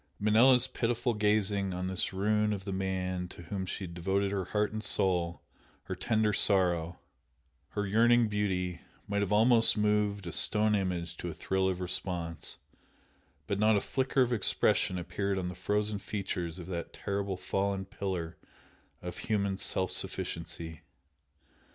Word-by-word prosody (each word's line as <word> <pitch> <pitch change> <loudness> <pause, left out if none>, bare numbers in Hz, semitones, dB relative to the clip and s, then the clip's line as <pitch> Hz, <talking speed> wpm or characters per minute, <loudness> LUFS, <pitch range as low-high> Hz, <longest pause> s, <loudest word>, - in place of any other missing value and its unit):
Manella's 120 +4 +5
pitiful 120 -1 -1
gazing 105 -2 +1
on 90 +1 -3
this 95 0 +1
ruin 105 +2 +1
of 95 -2 -5
the 100 - -3
man 95 -1 -2
to 85 - -12
whom 95 +2 -4
she 95 - -4
had 85 -2 -7
devoted 95 +3 0
her 95 -2 -1
heart 105 +3 0
and 110 0 -4
soul, 90 -4 +1 0.4
her - - -5
tender 110 -1 +1
sorrow, 90 -5 +2 0.8
her 105 0 -1
yearning 115 +3 +4
beauty, 95 -4 -1 0.3
might 100 0 0
have 100 -1 -1
almost 115 +2 +5
moved 105 -2 +1
a 85 - -4
stone 105 +5 +3
image 90 -4 -1
to 90 - -4
a 80 - -7
thrill 95 0 0
of 90 -1 -2
response, 90 -2 -3 0.9
but 100 -1 -2
not 110 0 +4
a - - 0
flicker 130 0 +1
of 125 0 -1
expression 95 -3 +2
appeared 95 +3 -2
on 90 -1 -2
the - - -5
frozen 105 +3 -1
features 95 -4 -3
of 90 - -7
that 85 -2 -5
terrible 100 -1 -3
fallen 95 +1 -1
pillar 90 -4 -4 0.7
of 90 - -6
human 100 -3 0
self 95 -1 -1
sufficiency. 80 -2 -4
100 Hz, 155 wpm, -31 LUFS, 90-105 Hz, 0.9 s, Manella's